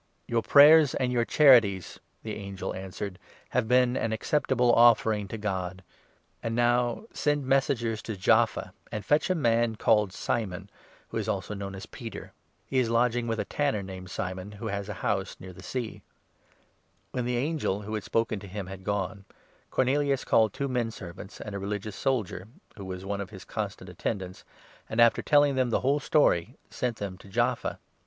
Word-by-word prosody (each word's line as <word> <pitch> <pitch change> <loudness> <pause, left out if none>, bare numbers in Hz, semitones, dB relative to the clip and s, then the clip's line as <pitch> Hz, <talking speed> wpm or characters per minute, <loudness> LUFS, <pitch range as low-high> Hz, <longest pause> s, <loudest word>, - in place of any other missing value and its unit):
"Your 115 -1 +1
prayers 150 +2 +7
and 125 -1 0
your 120 -1 +2
charities," 115 - +5 0.2
the 110 - -4
angel 100 -2 -5
answered, 95 0 -6 0.3
"have 125 -3 0
been 125 0 +4
an 115 - -1
acceptable 125 +1 +2
offering 110 -3 +4
to 115 - -6
God. 95 -3 -3 0.6
And 115 0 -2
now, 120 - +1
send 145 -1 0
5 - - -8
messengers 130 -5 +1
to 110 -3 -6
Jaffa 95 - +2 0.2
and 105 -2 -4
fetch 150 +4 +2
a 185 - +2
man 115 -6 +2
called 105 -2 +3
Simon, 100 -2 -3 0.4
who - - -4
is - - -2
also - - -2
known 100 -1 -6
as 95 - -8
Peter. - - -9 0.3
He 130 - 0
is 120 -3 +1
lodging 120 0 +2
with 115 -1 -1
a - - -1
tanner 140 -9 -1
named 95 -1 -8
Simon, 95 +2 -4
6 100 - -13
who 115 - -4
has 100 +1 -4
a - - -3
house 95 -2 -1
near 95 0 -10
the - - -12
sea." 120 -4 -5 1.1
When 125 - -2
the 125 0 0
angel, 135 -7 -1
who 110 +2 -6
had 105 -2 -2
spoken 115 -2 0
to 100 - -10
him, 100 +1 -5
had 95 0 -9
gone, 100 0 -2 0.4
Cornelius 135 +1 +1
7 - - -13
called 110 -2 +4
two 140 +1 -2
menservants 110 -7 -5
and 105 - -7
a 100 - -3
religious 105 +1 -4
soldier, 110 -8 -1 0.3
who 100 - -8
was 95 0 -6
one 100 0 -2
of 100 - -6
his 95 -2 -11
constant 100 -3 -5
attendants, 95 +1 -4 0.5
and, 110 - -3
after 115 -1 +5
telling 145 -1 +4
them 130 -2 +1
the 115 - +1
whole 140 +3 +2
8 - - -5
story, 125 - +2
sent 125 -2 -2
them 95 -2 -5
to 100 - -14
Jaffa. 120 +4 0
110 Hz, 190 wpm, -28 LUFS, 100-125 Hz, 1.1 s, prayers